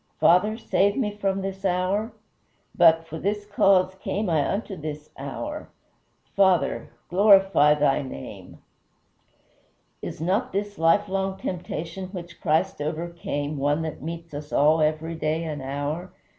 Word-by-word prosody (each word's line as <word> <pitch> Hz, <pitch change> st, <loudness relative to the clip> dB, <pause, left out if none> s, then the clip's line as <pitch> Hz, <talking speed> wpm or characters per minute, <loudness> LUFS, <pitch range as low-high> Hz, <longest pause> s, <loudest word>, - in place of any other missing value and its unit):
Father, 210 Hz, +6 st, +4 dB
save 200 Hz, -3 st, +1 dB
me 220 Hz, -6 st, 0 dB
from 195 Hz, -1 st, -1 dB
this 195 Hz, 0 st, -5 dB
hour? 190 Hz, +4 st, 0 dB, 0.6 s
But, 165 Hz, 0 st, +5 dB
for 160 Hz, 0 st, -7 dB
this 205 Hz, +1 st, -2 dB
cause 195 Hz, -2 st, +3 dB
came 190 Hz, 0 st, -3 dB
I 150 Hz, -3 st, +2 dB
unto 200 Hz, -1 st, -3 dB
this 150 Hz, -2 st, -7 dB
hour; 295 Hz, -, -6 dB, 0.7 s
Father, 190 Hz, -3 st, +2 dB, 0.2 s
glorify 195 Hz, -6 st, +5 dB
thy 145 Hz, -2 st, +2 dB
name!" 130 Hz, -, -9 dB, 1.4 s
Is -, -, -6 dB
not 185 Hz, +9 st, 0 dB
this 205 Hz, 0 st, -3 dB
lifelong 190 Hz, +3 st, +2 dB
temptation 180 Hz, 0 st, -5 dB
which 175 Hz, -2 st, -8 dB
Christ 160 Hz, +1 st, +1 dB
overcame 155 Hz, -2 st, -3 dB
one 145 Hz, +3 st, +1 dB
that 160 Hz, -2 st, -5 dB
meets 165 Hz, +1 st, -7 dB
us 145 Hz, +1 st, -7 dB
all 155 Hz, +2 st, +4 dB
every 155 Hz, +2 st, 0 dB
day 160 Hz, 0 st, -1 dB
and 150 Hz, -3 st, -4 dB
hour? 145 Hz, +6 st, -4 dB
170 Hz, 130 wpm, -25 LUFS, 155-195 Hz, 1.4 s, But